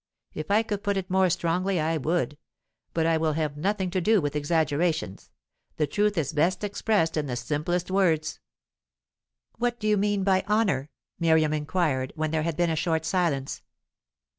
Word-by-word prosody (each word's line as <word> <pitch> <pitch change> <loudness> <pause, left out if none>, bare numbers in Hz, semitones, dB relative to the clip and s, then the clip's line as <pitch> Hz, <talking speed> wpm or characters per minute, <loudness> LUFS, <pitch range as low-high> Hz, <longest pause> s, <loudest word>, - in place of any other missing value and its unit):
If 155 0 -6
I 210 +2 +4
could 205 -2 -3
put 200 -1 0
it 185 -1 -4
more 190 0 +4
strongly, 175 +3 0
I 160 +1 0
would; 155 0 -1 0.5
but 165 -1 0
I 165 0 +3
will 160 -1 +1
have 155 -2 -2
nothing 190 +3 -1
to 185 0 0
do 215 +3 +4
with 145 -2 -2
exaggerations. 155 - 0 0.5
The 150 - +2
truth 205 +6 0
is 155 -5 -1
best 180 +6 +1
expressed 205 -5 0
in 150 -1 -1
the 125 - -3
simplest 155 +8 -2
words." 165 -5 +1 1.2
"What 240 0 0
do 215 - -2
you 210 -1 +3
mean 205 0 +1
by 190 -1 +3
honour?" 195 -11 +1 0.3
Miriam 160 -2 +3
inquired, 150 -4 -1
when 155 -1 -1
there 160 -1 0
had 160 -1 -2
been 175 -1 +2
a - - 0
short 160 0 0
silence. 160 -7 -1
165 Hz, 175 wpm, -26 LUFS, 155-190 Hz, 1.2 s, I